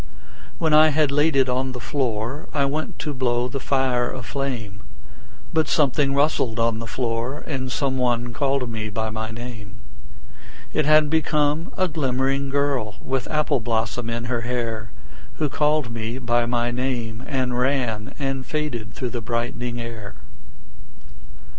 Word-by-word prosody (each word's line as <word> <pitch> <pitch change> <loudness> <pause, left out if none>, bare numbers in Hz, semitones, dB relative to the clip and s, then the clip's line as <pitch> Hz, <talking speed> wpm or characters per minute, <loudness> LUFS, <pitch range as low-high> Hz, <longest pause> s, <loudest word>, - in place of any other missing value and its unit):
When 160 -2 +2
I 155 +1 +8
had 150 -1 +3
laid 145 +2 +3
it 135 -1 +5
on 130 +1 0
the 125 - -5
floor 120 +1 -2
I 140 -2 +3
went 150 +3 -2
to 150 - -3
blow 125 -2 +1
the 135 +2 -3
fire 130 -3 +1
aflame, 125 -5 -4 0.7
But 160 -1 +3
something 140 -1 +3
rustled 140 -6 +2
on 115 -1 +2
the 115 - -5
floor, 120 +4 -2
And 130 -3 -3
some 130 -1 0
one 120 -1 +1
called 135 0 +1
me 110 -2 -4
by 110 +1 -2
my 110 0 -3
name: 115 -2 -8 1.0
It 155 -1 +2
had 155 -1 +6
become 155 0 +1
a 185 - +3
glimmering 135 -2 0
girl 135 -7 0
With 130 -2 -2
apple 150 -3 +2
blossom 115 0 -1
in 115 0 -2
her 120 -1 -1
hair 115 -1 -2 0.5
Who 150 -2 0
called 150 -3 +1
me 115 +1 -3
by 120 -2 +1
my 120 0 +1
name 120 -2 -2
and 130 -4 0
ran 125 -5 0
And 135 -2 -2
faded 125 -8 -3
through 125 -3 -3
the 120 - -3
brightening 120 +1 -2
air. 115 -3 -6
125 Hz, 155 wpm, -24 LUFS, 115-140 Hz, 1.0 s, I